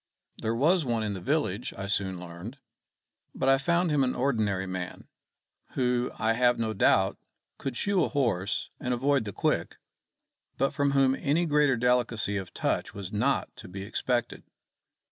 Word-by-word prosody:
There 110 +1 0
was 160 +8 +3
one 120 -4 -1
in 105 -1 -2
the 95 - -6
village, 120 - -1
I 95 - -4
soon 95 -2 -1
learned; 90 +8 -8 0.8
but 130 - -1
I 135 0 +5
found 170 +3 +1
him 145 -2 +3
an 125 - 0
ordinary 110 -8 0
man, 90 -1 -6 0.7
who, 125 -1 +1
I 110 0 +2
have 120 +1 +3
no 110 -1 -1
doubt, 95 -1 +3 0.4
could 135 -3 -3
shoe 200 -4 +2
a - - +1
horse 115 -9 -1
and 125 0 -1
avoid 135 -1 +1
the 100 - -4
quick, - - -1 0.8
but 135 - +1
from 140 -2 +1
whom 135 -1 +4
any 150 +6 +1
greater 145 -4 +3
delicacy 120 -4 +1
of 95 -2 -5
touch - - -2
was 100 0 -6
not 130 +7 0
to - - -10
be 95 +2 -7
expected. 120 +3 -1
120 Hz, 165 wpm, -28 LUFS, 100-140 Hz, 0.8 s, I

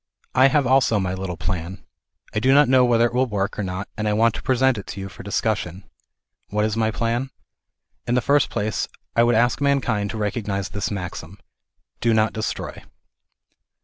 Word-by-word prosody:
I 130 +1 +6
have 140 0 +2
also 130 -3 +3
my 95 -1 -1
little 95 -2 -4
plan. 90 0 -4 0.5
I 105 - +1
do 130 +4 +4
not 145 0 +6
know 130 0 +5
whether 120 -1 +4
it 120 - -1
will 130 +1 +2
work 100 -2 -2
or - - 0
not 95 +1 -4
and 105 0 -2
I 105 - +2
want 115 +2 +3
to - - -6
present 130 -2 +2
it 100 - -10
to - - -7
you 95 0 -5
for 105 - -11
discussion. 100 -3 -2 0.7
What 105 +1 +1
is 110 0 -1
my 110 -1 +1
plan? 115 +4 -1 0.8
In 120 - +1
the 125 - +3
first 140 +2 +3
place 105 +1 -2 0.3
I 115 - +5
would 120 0 +4
ask 120 +4 +2
mankind 130 -8 +1
to 110 - -5
recognize 100 -2 -2
this 100 +2 -3
maxim 90 -3 -6
ŌĆö - - -28 0.4
" - - -50
Do 115 -1 +3
not 110 0 +2
destroy." 110 0 -4
110 Hz, 205 wpm, -22 LUFS, 100-120 Hz, 0.8 s, I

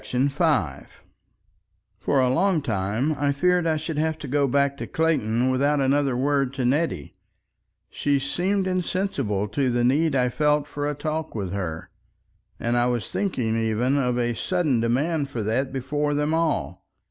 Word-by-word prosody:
§ 130 +3 0
5 135 - -1 1.0
For 140 - +1
a 130 -1 +3
long 175 +1 +2
time 110 +5 -1
I 145 -1 +2
feared 180 +4 +2
I 160 -1 +2
should 155 0 -3
have 160 0 0
to 150 - -8
go 140 +1 +1
back 140 +1 +1
to - - -5
Clayton 130 -7 +1
without 140 +3 +2
another 135 -1 +2
word 135 0 0
to 130 -2 -1
Nettie, 130 - 0 0.7
she 145 -1 0
seemed 185 +8 0
insensible 180 - -1
to 130 +4 0
the 120 0 +1
need 145 +4 +2
I 125 -1 +2
felt 150 +2 +1
for 145 0 -3
a 150 - -3
talk 155 +1 -4
with 100 -4 -3
her, 80 -5 -4 0.7
and 120 +1 0
I 120 - +2
was 120 -2 -2
thinking 125 - -1
even 115 +4 +1
of 125 -2 0
a 120 -1 0
sudden 155 - 0
demand 140 +6 0
for 120 -5 -4
that 130 +6 -1
before 145 +3 -1
them 150 +2 0
all. 165 -2 -1
140 Hz, 170 wpm, -24 LUFS, 120-155 Hz, 1.0 s, a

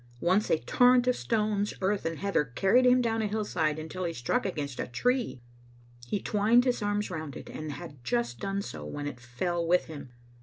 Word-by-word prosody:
Once 185 - +2
a - - +4
torrent 245 +8 +4
of 250 0 +3
stones, 210 -2 0
earth, 195 -1 0
and 165 -1 -3
heather 200 -4 +1
carried 195 - +3
him 250 0 +5
down 225 -2 0
a 215 - 0
hillside 180 -8 -1
until 160 +4 -5
he 170 - -1
struck 180 - -1
against 145 -7 -4
a - - -2
tree. 245 - 0 0.7
He 200 - -1
twined 220 +5 +3
his 250 -3 +1
arms 205 -1 -1
round 155 -5 -5
it, - - -9
and 155 -1 -5
had 145 -4 -10
just 120 -1 -1
done 195 0 -2
so 75 - -7
when 145 - -5
it 135 -4 -5
fell 150 +9 -2
with 175 +2 +3
him. 145 -4 -9
185 Hz, 200 wpm, -29 LUFS, 145-215 Hz, 0.7 s, him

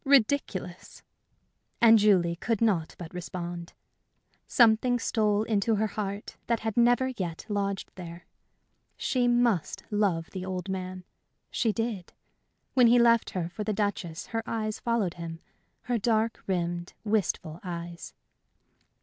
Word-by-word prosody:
Ridiculous! 240 -9 +1 0.8
And 225 -1 +7
Julie 185 -5 +4
could 225 +4 -1
not 190 -9 +1
but 170 -1 -9
respond. 175 -1 -6 0.7
Something 240 +1 +4
stole 215 -3 +1
into 220 0 +1
her 215 +1 +1
heart 200 -1 -4
that 235 -1 +1
had 220 -1 -2
never 245 +2 +4
yet 180 -10 -5
lodged 200 -1 -2
there. 170 -2 -9 0.7
She 250 -2 +1
must 240 -7 +1
love 195 -6 0
the 185 - -5
old 185 0 -4
man 185 -1 -4 0.5
she 225 - +1
did. 225 -5 -3 0.6
When 250 -3 +6
he 240 +1 +6
left 235 -1 +4
her 170 -2 -1
for 200 +5 -5
the 215 - -1
Duchess 200 -5 -2
her 225 - 0
eyes 215 -1 -2
followed 230 -7 0
him 165 -1 -7 0.4
her 245 -2 0
dark 225 +1 +1
rimmed, 175 -1 -2
wistful 195 -6 -1
eyes. 170 -1 -6
205 Hz, 130 wpm, -28 LUFS, 175-230 Hz, 0.8 s, And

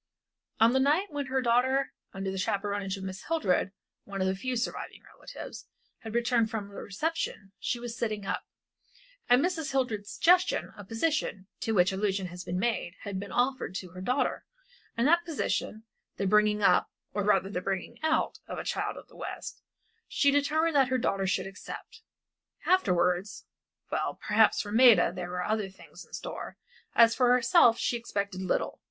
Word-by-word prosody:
On 225 +2 +6
the 265 - +3
night 305 +9 +2
when 285 -2 -3
her 260 0 0
daughter, 255 +3 +2 0.2
under 195 0 -4
the 190 - -4
chaperonage 200 -1 -1
of 190 - -8
Mrs. 190 0 -7
Hildred, 200 - +1 0.3
one 200 -1 -6
of 190 - +1
her 190 - +1
few 250 +7 -3
surviving 235 +1 -4
relatives - - -9 0.4
returned 235 0 +1
from 215 -3 -4
the - - -15
reception, 205 - -3
she 240 - -2
was 240 -1 -5
still 235 - 0
sitting 210 -2 -5
up. - - -2 0.9
At 245 - +7
Mrs. 320 -3 -1
Hildred's 220 -6 -1
suggestion 360 +2 +3
a 205 - -9
position, 225 -2 -1
to 225 - -1
which 180 -2 +4
allusion 195 0 -1
has 180 +1 -8
been 175 0 -3
made, 190 -4 -1
had 200 -2 -4
been 200 +1 -7
offered 250 -6 0
to 185 -2 -5
her 185 +1 -9
daughter, 250 +8 0 0.5
and 235 +3 +3
that 340 +2 +4
position 285 -8 -2 0.3
the 200 - -1
bringing 210 +1 +3
up 180 -2 +4 0.2
or 205 - -1
rather 195 -1 +2
the 180 - -2
bringing 195 +5 -4
out 315 0 +1
of - - -5
a - - -4
child - - -2
of - - -11
the - - -20
West - - -7 0.5
she 280 - +3
determined 305 +3 +2
that 270 -2 +5
her 260 - +2
daughter 195 -5 0
should 190 - 0
accept. 195 +1 -9 0.6
Afterwards 180 - +1 0.5
well, - - -1
perhaps 215 +1 +3
for 205 - -7
Maida 230 -6 +6
there 180 -1 -5
were 180 0 -3
other 215 -1 -1
things 190 - -14
in - - -22
store, - - -6 0.4
as 230 -1 +7
for 250 -1 +3
herself 245 -1 +5
she 240 - 0
expected 200 -4 -3
little. 185 - -1
220 Hz, 180 wpm, -29 LUFS, 195-260 Hz, 0.9 s, At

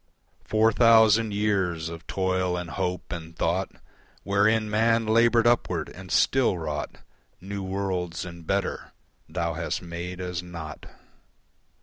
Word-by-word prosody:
Four 110 +1 +3
thousand 115 -1 +5
years 95 -6 0
of 80 0 -9
toil 95 -1 0
and 85 -1 -5
hope 90 -2 -3
and 85 -1 -7
thought 90 +4 0 0.5
Wherein 110 +2 +2
man 115 +2 +2
laboured 115 +1 +4
upward 95 -9 +1
and 90 0 -11
still 125 - +3
wrought 75 -3 -4 0.4
New 100 +2 -6
worlds 95 -3 -3
and 85 -2 -10
better, 100 0 -2 0.4
Thou 85 -2 -2
hast 85 +2 -3
made 85 +1 -6
as 90 -2 -3
naught. 85 -3 -8
95 Hz, 125 wpm, -26 LUFS, 85-105 Hz, 0.5 s, thousand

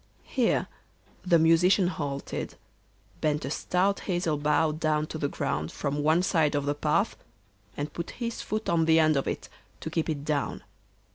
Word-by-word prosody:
Here 250 -4 +1 0.6
the 175 -2 +4
Musician 165 +4 +4
halted, 140 -6 -4 0.7
bent 150 -2 0
a 135 - -4
stout 190 +5 +1
hazel 175 -4 -1
bough 150 +1 +2
down 155 0 0
to 155 - -6
the 145 - 0
ground 75 - -2
from 145 0 -2
one 160 +4 +3
side 160 -6 +2
of 145 -1 0
the 145 - +1
path, 145 - +1 0.6
and 145 +1 -4
put 170 - -5
his 235 -1 -3
foot 215 +1 -3
on 165 -1 +2
the 160 0 +5
end 155 -1 +4
of 135 - 0
it - - -3 0.3
to 160 - -5
keep 165 0 -1
it 145 -2 -3
down. 150 -2 -1
155 Hz, 170 wpm, -28 LUFS, 145-175 Hz, 0.7 s, the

